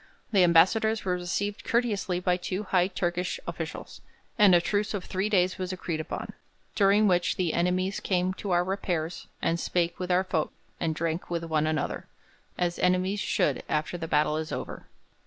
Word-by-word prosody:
The 195 -4 +5
ambassadors 215 +6 +4
were 185 - +1
received 180 +3 -2
courteously 210 -6 0
by 180 -1 +2
two 185 +3 -3
high 185 -2 +2
Turkish 180 - -2
officials, - - -6 0.3
and 205 -6 +6
a - - +6
truce 205 +4 -1
of 195 - -4
three 190 +2 -1
days 185 -2 +2
was 185 0 -2
agreed 175 -3 -3
upon, 160 - -5 0.4
during 205 +1 +4
which 180 -2 +2
'the 175 -4 0
enemies 185 +2 0
came 185 -1 0
to 195 +1 -6
our 175 -1 +3
repairs 180 -3 -3 0.2
and 165 +1 +1
spake 170 -1 -1
with 180 0 -3
our 180 +1 +3
folk, 165 -4 -1 0.3
and 160 -2 -1
drank 165 +2 -2
with 170 -1 -2
one 155 -2 0
another,' 155 -2 -2 0.5
as 175 -1 -1
enemies 185 +2 +2
should 145 -7 +1
after 155 +3 -1
the 165 -2 -4
battle 150 0 +2
is 155 0 -4
over. - - -6
180 Hz, 175 wpm, -27 LUFS, 170-195 Hz, 0.5 s, and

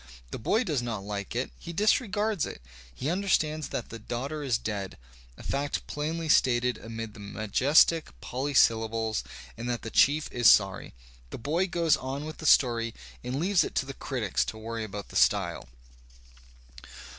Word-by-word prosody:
The - - -5
boy 215 - +1
does 150 - -1
not 115 -5 -4
like 100 -1 -5
it, - - -2
he - - -7
disregards 210 - +1
it.. - - -8 0.3
He 130 - -3
understands 155 -5 0
that 120 - -5
the 115 - -8
daughter 135 +7 -4
is 130 -6 +1
dead, 100 -4 -4 0.4
a - - -12
fact 140 +1 -2
plainly 160 +2 -3
stated 125 -4 +3
amid 115 0 -7
the - - -13
majestic 125 +11 +3
polysyllables, 115 -4 +1 0.3
and 120 +2 -5
that 120 -1 -2
the 115 - -6
chief 150 +2 +4
is 120 -1 +5
sorry. 95 - +3 0.3
The - - -6
boy 160 +10 0
goes 165 -4 +2
on 135 +1 -5
with 155 0 -8
the 160 - -3
story 115 -4 +4 0.3
and 130 +3 -3
leaves 185 +2 +3
it - - -6
to - - +1
the 135 - -6
critics 120 -8 -1
to 110 - -6
worry 115 +1 -5
about 105 -1 -7
the - - -12
style. - - +2
130 Hz, 170 wpm, -28 LUFS, 110-155 Hz, 0.4 s, is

